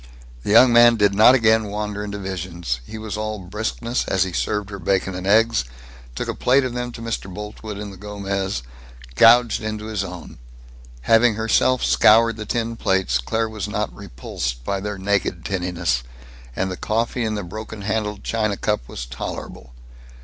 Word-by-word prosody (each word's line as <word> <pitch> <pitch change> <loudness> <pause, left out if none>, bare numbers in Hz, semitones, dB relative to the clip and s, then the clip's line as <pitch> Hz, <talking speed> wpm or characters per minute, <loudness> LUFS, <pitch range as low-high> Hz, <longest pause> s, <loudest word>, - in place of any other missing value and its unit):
The - - -6
young 120 +3 +7
man 120 0 +7
did 105 -2 +3
not 110 +5 +7
again 110 -2 +3
wander 105 0 -4
into 100 -1 -5
visions. 90 -9 -4
He 110 - -7
was 110 -1 -5
all 110 0 -3
briskness 110 +5 -3
as 95 -1 +2
he 95 -2 -5
served 105 +3 -2
her 100 - -6
bacon 95 +2 0
and 90 +1 -5
eggs, 115 - +4 0.5
took - - -3
a - - -2
plate 130 +2 +3
of 125 -2 -3
them 125 0 -3
to 115 - -8
Mr. 110 -4 -4
Boltwood 105 +1 -7
in 105 0 -6
the 95 - -11
Gomez, 100 -4 -3 0.5
gouged 115 - +5
into 110 0 -4
his 110 -3 -2
own. 90 -8 -9 0.6
Having 115 - +4
herself 110 +3 +2
scoured 115 +1 +5
the 110 -1 -6
tin 115 0 -2
plates, 95 - +1
Claire 110 - -1
was 110 -4 -5
not - - -2
repulsed - - -5
by 100 +8 -2
their 105 +1 -4
naked 95 -3 -1
tinniness; 90 -8 -1 0.5
and 95 0 -1
the 90 - -5
coffee 115 +3 -1
in 110 -1 -1
the 105 - -3
broken 110 +3 -8
handled 105 -1 -2
china 110 -3 -1
cup 105 - -1
was - - -6
tolerable. - - -7
105 Hz, 180 wpm, -22 LUFS, 95-110 Hz, 0.6 s, young